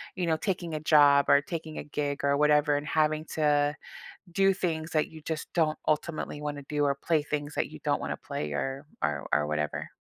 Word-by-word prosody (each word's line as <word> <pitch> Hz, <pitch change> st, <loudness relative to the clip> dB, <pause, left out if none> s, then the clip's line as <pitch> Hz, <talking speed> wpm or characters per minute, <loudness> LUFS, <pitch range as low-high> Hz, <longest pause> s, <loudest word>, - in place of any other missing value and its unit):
you 180 Hz, -2 st, -1 dB
know, 160 Hz, -, +3 dB
taking 175 Hz, -2 st, -2 dB
a 155 Hz, -, -4 dB
job, 145 Hz, -2 st, +6 dB
or 140 Hz, -, +7 dB
taking 160 Hz, +1 st, -6 dB
a -, -, -5 dB
gig, 145 Hz, -1 st, -3 dB
or 140 Hz, 0 st, +3 dB
whatever, 150 Hz, 0 st, +4 dB
and 145 Hz, -, -4 dB
having 155 Hz, 0 st, +1 dB
to 145 Hz, -1 st, +2 dB, 0.6 s
do 195 Hz, +2 st, +4 dB
things 165 Hz, -4 st, -2 dB
that 155 Hz, -1 st, +2 dB
you 160 Hz, -1 st, -12 dB
just 160 Hz, 0 st, -5 dB
don't 155 Hz, -2 st, +2 dB
ultimately 155 Hz, -1 st, -1 dB
wanna 145 Hz, -1 st, -4 dB
do, 150 Hz, -1 st, 0 dB
or 140 Hz, -1 st, +1 dB
play 155 Hz, +2 st, +1 dB
things 145 Hz, 0 st, -4 dB
that -, -, 0 dB
you -, -, -10 dB
don't -, -, +1 dB
wanna -, -, -3 dB
play 75 Hz, -, -4 dB
or 135 Hz, -, -3 dB, 0.2 s
or 75 Hz, -1 st, -1 dB
or 75 Hz, -, +3 dB
whatever? 75 Hz, -1 st, -2 dB
150 Hz, 210 wpm, -28 LUFS, 145-160 Hz, 0.6 s, or